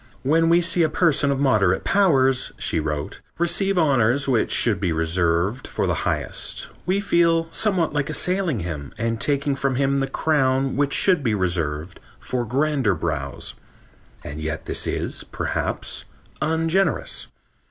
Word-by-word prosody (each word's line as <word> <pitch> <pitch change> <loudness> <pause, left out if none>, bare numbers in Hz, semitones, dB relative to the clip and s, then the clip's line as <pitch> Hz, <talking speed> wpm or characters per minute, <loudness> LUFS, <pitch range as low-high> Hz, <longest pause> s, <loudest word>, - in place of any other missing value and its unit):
"When 165 +4 +3
we 170 +1 +5
see 175 0 +2
a 160 - +3
person 155 -3 +2
of 140 -1 0
moderate 105 -9 +2
powers," 135 -10 +2
she 80 - 0
wrote, 75 -1 -4 0.2
"receive 195 +3 +1
honors 135 -4 +3
which 125 -4 +1
should 115 -4 +2
be 90 -4 0
reserved 85 +7 0
for - - -2
the - - +1 0.2
highest, - - -3 0.2
we 190 +2 +2
feel 170 -4 +2
somewhat 185 -7 +1
like 145 -2 -1
assailing 180 - 0
him 80 -5 -6
and 115 0 -2
taking 140 0 0
from 135 -1 -1
him 140 +1 +1
the 135 - -1
crown 135 -4 +1
which 140 +1 +1
should 185 -5 +4
be 115 -4 +1
reserved 85 -4 -2 0.2
for 125 -2 -3
grander 135 -3 +1
brows. 80 - -4 0.7
And 75 +2 -6
yet 80 0 -4
this - - -2
is, - - -3
perhaps, - - -3 0.4
ungenerous.... 160 - 0
135 Hz, 150 wpm, -22 LUFS, 105-165 Hz, 0.7 s, we